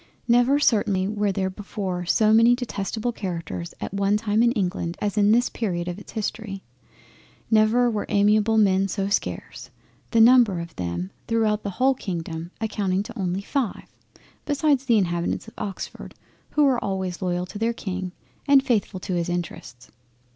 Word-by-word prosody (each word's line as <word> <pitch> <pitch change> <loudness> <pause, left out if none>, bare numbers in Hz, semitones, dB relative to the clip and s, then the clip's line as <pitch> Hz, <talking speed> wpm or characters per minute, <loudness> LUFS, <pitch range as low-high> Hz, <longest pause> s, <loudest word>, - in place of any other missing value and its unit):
Never 245 +4 +4
certainly 205 -8 +2
were 205 -1 0
there 190 0 -1
before 185 -3 -5
so 215 +3 +4
many 230 +2 +6
detestable 230 -1 -3
Characters 170 -5 -5
at - - -5
one 200 +1 +2
time 215 0 +1
in 235 0 +4
England 180 -5 -2
as 205 0 -2
in 205 -1 +4
this 240 +2 +4
Period 175 -6 -3
of 175 +2 -4
its 205 - -13
History; 215 -2 -4 0.9
never 220 +3 +4
were 215 -3 -2
amiable 210 +2 +3
men 195 -2 +3
so 195 0 -2
scarce. 200 - -3 0.4
The 230 - +2
number 230 -5 +6
of 170 -1 -8
them 90 +1 -4 0.2
throughout 220 -2 +1
the 200 - -4
whole 265 +1 +4
Kingdom 170 -7 -5
amounting 205 -3 -1
only 190 -2 -2
to - - -20
five, 270 -8 -2 0.6
besides 290 -2 +1
the 235 -4 +4
inhabitants 175 +1 -1
of 225 - -12
Oxford 195 -3 -6 0.4
who 300 - +4
were 265 -4 +2
always 190 -2 -3
loyal 180 -1 -1
to 205 +3 -8
their 225 +1 +1
King 185 -4 -5 0.4
and 280 -1 +6
faithful 210 -5 0
to 185 - -4
his 175 0 -1
interests. 130 -8 -6
205 Hz, 165 wpm, -24 LUFS, 185-230 Hz, 0.9 s, many